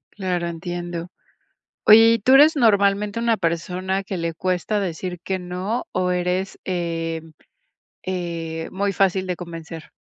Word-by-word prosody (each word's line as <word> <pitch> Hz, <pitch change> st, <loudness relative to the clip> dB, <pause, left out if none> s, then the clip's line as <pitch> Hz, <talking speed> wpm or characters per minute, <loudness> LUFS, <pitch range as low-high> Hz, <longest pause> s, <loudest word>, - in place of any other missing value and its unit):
Claro, 180 Hz, -3 st, -2 dB
entiendo. 175 Hz, 0 st, -5 dB, 0.8 s
Oye, 225 Hz, +1 st, +8 dB
¿y 230 Hz, -, +1 dB
tú 255 Hz, +6 st, +2 dB
eres 300 Hz, +3 st, +7 dB
normalmente 205 Hz, -3 st, +2 dB
una 230 Hz, -1 st, +2 dB
persona 185 Hz, +2 st, -2 dB
que 195 Hz, -, -4 dB
le 165 Hz, -1 st, -2 dB
cuesta 185 Hz, +4 st, -1 dB
decir 180 Hz, -1 st, -4 dB
que 190 Hz, +1 st, -2 dB
no? 185 Hz, +6 st, -3 dB
O, 180 Hz, 0 st, 0 dB
¿eres 180 Hz, +2 st, -1 dB
eh 165 Hz, -3 st, -2 dB, 0.8 s
eh, 165 Hz, -3 st, -4 dB
muy 200 Hz, +1 st, -1 dB
fácil 190 Hz, 0 st, +2 dB
de 180 Hz, -1 st, -2 dB
convencer? 165 Hz, -2 st, -9 dB
180 Hz, 135 wpm, -22 LUFS, 170-200 Hz, 0.8 s, Oye